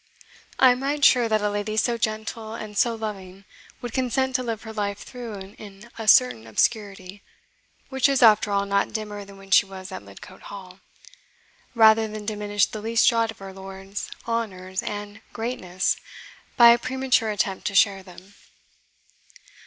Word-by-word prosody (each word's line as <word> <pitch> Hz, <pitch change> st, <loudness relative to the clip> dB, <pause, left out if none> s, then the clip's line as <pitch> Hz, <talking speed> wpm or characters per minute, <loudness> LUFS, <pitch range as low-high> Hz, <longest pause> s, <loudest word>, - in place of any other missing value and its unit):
I 260 Hz, -1 st, +7 dB
am 250 Hz, +1 st, -1 dB
right 285 Hz, +1 st, +1 dB
sure 240 Hz, -3 st, +5 dB
that 215 Hz, -1 st, +1 dB
a 210 Hz, -, +1 dB
lady 205 Hz, +1 st, -3 dB
so 240 Hz, +2 st, +2 dB
gentle 220 Hz, 0 st, -4 dB
and 215 Hz, -2 st, -8 dB
so 230 Hz, +3 st, +2 dB
loving 195 Hz, -3 st, -7 dB, 0.4 s
would 240 Hz, -2 st, -5 dB
consent 260 Hz, +1 st, 0 dB
to 255 Hz, -, +2 dB
live 230 Hz, -3 st, -4 dB
her 220 Hz, -1 st, -8 dB
life 200 Hz, -2 st, -2 dB
through 240 Hz, -3 st, -8 dB, 0.2 s
in 210 Hz, +2 st, -12 dB
a 225 Hz, -1 st, -7 dB
certain 125 Hz, -, +5 dB
obscurity 195 Hz, -, -1 dB, 0.7 s
which 265 Hz, 0 st, +2 dB
is, 270 Hz, -2 st, +2 dB
after 215 Hz, -1 st, +6 dB
all, 200 Hz, 0 st, +1 dB
not 200 Hz, 0 st, 0 dB
dimmer 210 Hz, -2 st, -5 dB
than 200 Hz, 0 st, -14 dB
when 195 Hz, 0 st, -15 dB
she 195 Hz, -, +6 dB
was 190 Hz, 0 st, -9 dB
at 185 Hz, -, -6 dB
Lidcote 100 Hz, -, -14 dB
Hall 190 Hz, -2 st, -11 dB, 1.0 s
rather 220 Hz, -1 st, +6 dB
than 215 Hz, -1 st, -8 dB
diminish 205 Hz, -1 st, 0 dB
the 215 Hz, -, -8 dB
least 225 Hz, +1 st, +2 dB
jot 230 Hz, -2 st, +3 dB
of 220 Hz, -, -8 dB
her 195 Hz, -1 st, -10 dB
lord's 195 Hz, +1 st, -8 dB, 0.2 s
honours 190 Hz, -5 st, -3 dB
and 205 Hz, 0 st, -6 dB
greatness 190 Hz, -6 st, -2 dB, 0.6 s
by 235 Hz, -2 st, +9 dB
a 235 Hz, -, +4 dB
premature 255 Hz, -3 st, 0 dB
attempt 200 Hz, -1 st, -2 dB
to 205 Hz, -, -3 dB
share 195 Hz, -1 st, +4 dB
them." 185 Hz, +1 st, -15 dB
210 Hz, 170 wpm, -24 LUFS, 195-230 Hz, 1.0 s, by